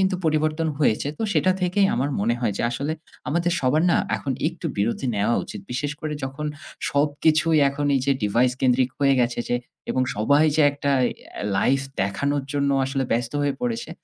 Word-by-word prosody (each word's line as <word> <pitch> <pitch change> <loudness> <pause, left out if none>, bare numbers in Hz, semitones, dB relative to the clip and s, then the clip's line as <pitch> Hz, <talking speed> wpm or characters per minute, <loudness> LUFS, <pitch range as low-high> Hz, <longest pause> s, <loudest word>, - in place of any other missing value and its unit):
কিন্তু 190 0 +2
পরিবর্তন 155 +1 +1
হয়েছে। 140 -1 +2
তো - - -2
সেটা 185 - +3
থেকেই 185 +2 +3
আমার 135 +4 0
মনে 115 +3 +1
হয় 115 -4 0
যে - - -1
আসলে 140 +6 -2 0.4
আমাদের 170 +3 +1
সবার 140 +4 +2
না - - +4 0.2
এখন 135 - -3 0.2
একটু 170 0 -7
বিরতি 115 +6 -1
নেওয়া 105 +3 +1
উচিত। - - -8
বিশেষ 145 +4 -2
করে 155 -1 -3
যখন 135 +3 -5 0.4
সবকিছুই 155 +2 +2
এখন 145 +1 -2
এই 135 - +2
যে 140 - +4
ডিভাইস 120 +5 +2
কেন্দ্রিক 130 0 +3
হয়ে 140 -1 +4
গেছে 120 0 0
যে 120 - +2 0.3
এবং 130 - +1
সবাই 140 +8 +4
যে 155 - +5
একটা 140 0 -2 0.2
এ - - -9
লাইফ 135 +6 +2 0.2
দেখানোর 140 +8 -1
জন্য 140 -1 +1
আসলে 135 0 -1
ব্যস্ত 120 0 -1
হয়ে 140 -1 0
পড়েছে। 235 -1 -3
140 Hz, 185 wpm, -23 LUFS, 125-155 Hz, 0.4 s, যে